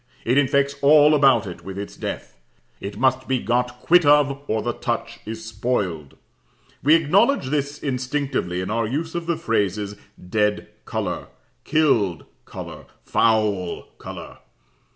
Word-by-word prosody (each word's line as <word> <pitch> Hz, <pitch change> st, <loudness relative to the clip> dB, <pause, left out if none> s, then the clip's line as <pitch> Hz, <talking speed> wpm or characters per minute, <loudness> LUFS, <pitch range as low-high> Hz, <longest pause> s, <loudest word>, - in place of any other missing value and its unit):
It 120 Hz, -, +2 dB
infects 140 Hz, 0 st, +2 dB
all 150 Hz, +1 st, +6 dB
about 135 Hz, -7 st, +4 dB
it 90 Hz, -3 st, -8 dB
with 95 Hz, +1 st, -7 dB
its 100 Hz, 0 st, -6 dB
death. -, -, -6 dB, 0.4 s
It 100 Hz, +1 st, -7 dB
must 130 Hz, +1 st, +1 dB
be 130 Hz, -, +1 dB
got 125 Hz, +1 st, -1 dB
quit 175 Hz, +1 st, +5 dB
of, 145 Hz, -1 st, +4 dB
or 110 Hz, 0 st, -1 dB
the -, -, -1 dB
touch -, -, -4 dB
is 110 Hz, 0 st, -6 dB
spoiled. 100 Hz, -, -3 dB, 0.6 s
We 150 Hz, +4 st, +6 dB
acknowledge 165 Hz, -, +2 dB
this 145 Hz, -1 st, -1 dB
instinctively 130 Hz, -9 st, -2 dB
in 95 Hz, -, -4 dB
our 115 Hz, 0 st, 0 dB
use 160 Hz, +7 st, -3 dB
of 170 Hz, -1 st, -4 dB
the 170 Hz, -2 st, 0 dB
phrases 105 Hz, -2 st, -1 dB, 0.2 s
"dead 105 Hz, +3 st, -1 dB, 0.2 s
colour," -, -, -3 dB, 0.4 s
"killed 125 Hz, -, +2 dB, 0.2 s
colour," -, -, -9 dB, 0.2 s
"foul 105 Hz, -5 st, +1 dB, 0.2 s
colour." -, -, -9 dB
125 Hz, 140 wpm, -22 LUFS, 105-145 Hz, 0.6 s, all